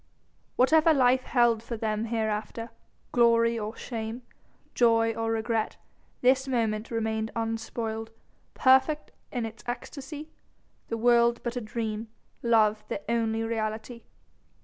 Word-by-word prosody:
Whatever 315 +5 +5
life 255 -1 +4
held 240 -3 +3
for 230 0 -5
them 215 0 -1
hereafter, 225 0 -2 0.4
glory 230 -1 +4
or 215 +1 -4
shame, 230 0 -5 0.5
joy 230 -1 +3
or 225 0 -2
regret, 225 -1 -1 0.4
this 265 +1 +3
moment 225 -4 -1
remained 220 -1 -1
unspoiled, 225 0 -3 0.5
perfect 265 +3 +3 0.2
in 245 -4 -2
its 220 0 -8
esctasy, 285 +5 -6 0.6
the 230 - -3
world 235 0 +4
but 240 0 -3
a 245 - -2
dream, 220 0 -4 0.3
love 215 -2 +3
the 200 - -4
only 225 -1 0
reality. 225 +1 -3
230 Hz, 120 wpm, -28 LUFS, 220-245 Hz, 0.6 s, Whatever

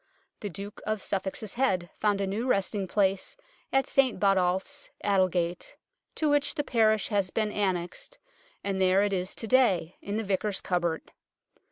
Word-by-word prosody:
The 205 - -4
Duke 200 +3 -7
of 215 0 0
Suffolk's 195 +2 -3
head 190 -9 0
found 205 -2 +1
a - - +1
new 210 +6 -2
resting 195 -3 +1
place 195 - 0 0.3
at 270 0 +3
St 265 -3 +2
Botolph's, 195 +8 +1
Aldgate, 185 -3 0 0.4
to 310 - 0
which 290 -1 +2
the 290 - 0
parish 220 -5 +2
has 200 -4 +1
been 215 +2 -1
annexed, 185 -4 -2 0.5
and 195 -1 -1
there 190 +1 +4
it 205 -1 0
is 185 0 -2
to - - -5
day, 205 -9 +2
in 200 +1 -3
the 225 - -1
Vicar's 200 0 -1
cupboard. 175 -3 -2
200 Hz, 160 wpm, -28 LUFS, 185-220 Hz, 0.5 s, there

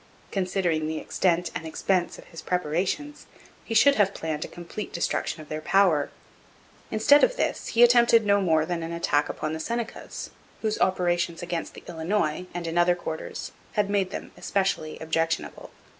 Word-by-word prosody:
Considering 180 -5 0
the 160 0 -2
extent 175 +1 0
and 160 - -5
expense 175 +2 0
of - - -12
his 165 - -10
preparations, 180 - -2 0.4
he 225 - -4
should 280 +6 +7
have 200 0 +2
planned 155 -1 -3
a - - -5
complete 175 +5 -7
destruction 170 -2 -2
of - - -16
their 155 +1 -4
power. 175 -4 +3 0.8
Instead 225 +7 +5
of - - +4
this - - -1
he 240 - +8
attempted 235 -2 +6
no 200 0 +4
more 160 -4 +3
than 175 0 -2
an 165 0 -4
attack 145 -3 +1
upon 155 0 -3
the 160 - -4
Senecas, 235 +6 -5 0.3
whose 215 -1 -1
operations 175 -2 +1
against 175 -1 -4
the - - -11
Illinois 175 0 -1
and 175 -1 -5
in 165 +1 0
other 175 0 +4
quarters 160 -2 -6 0.2
had 205 -1 +1
made 195 -2 +1
them - - -7
especially 190 -6 -1
objectionable. 165 +1 -2
175 Hz, 170 wpm, -26 LUFS, 160-200 Hz, 0.8 s, he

